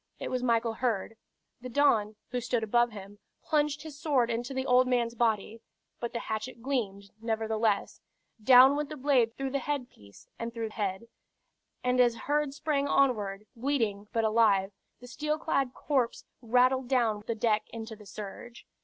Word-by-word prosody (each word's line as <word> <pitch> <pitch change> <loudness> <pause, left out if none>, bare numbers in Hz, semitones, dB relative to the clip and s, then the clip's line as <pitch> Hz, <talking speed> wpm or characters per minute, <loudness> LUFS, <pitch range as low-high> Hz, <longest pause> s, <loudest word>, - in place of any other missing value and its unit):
It - - -5
was 255 -1 -1
Michael 230 -2 +1
Heard. 225 -2 -2 0.5
The 255 - -7
Don, 230 -6 +2 0.2
who 250 0 -1
stood 240 -1 -1
above 240 +2 +3
him, 205 -1 -11 0.2
plunged 295 -1 0
his 300 -3 -10
sword 255 -6 +1
into 240 +3 -3
the 265 0 -2
old 255 0 +4
man's 240 -2 +1
body: 225 -1 0 0.4
but 235 - -4
the 235 - -4
hatchet 220 +3 -5
gleamed, 200 -7 -3
nevertheless: 220 -2 -1 0.4
down 260 +3 +8
went 295 0 -2
the 305 - -7
blade 255 -4 +2
through 270 -1 -3
headpiece 255 - -5
and 230 0 -4
through 225 -1 -3
head; 205 0 -3 0.8
and 250 0 +1
as 240 -2 +4
Heard 290 +3 -1
sprang 285 -2 0
onward, 215 -8 +1
bleeding, 225 -6 -1
but 225 - 0
alive, 215 -3 +3 0.3
the 245 - -12
steel 300 +5 -2
clad 275 -5 -1
corpse 265 -5 -1 0.2
rattled 250 +2 +3
down 235 -5 +1
the 230 - -1
deck 215 -1 0
into 225 -1 -7
the 210 -1 -15
surge. 215 +4 -9
240 Hz, 160 wpm, -29 LUFS, 220-265 Hz, 0.8 s, down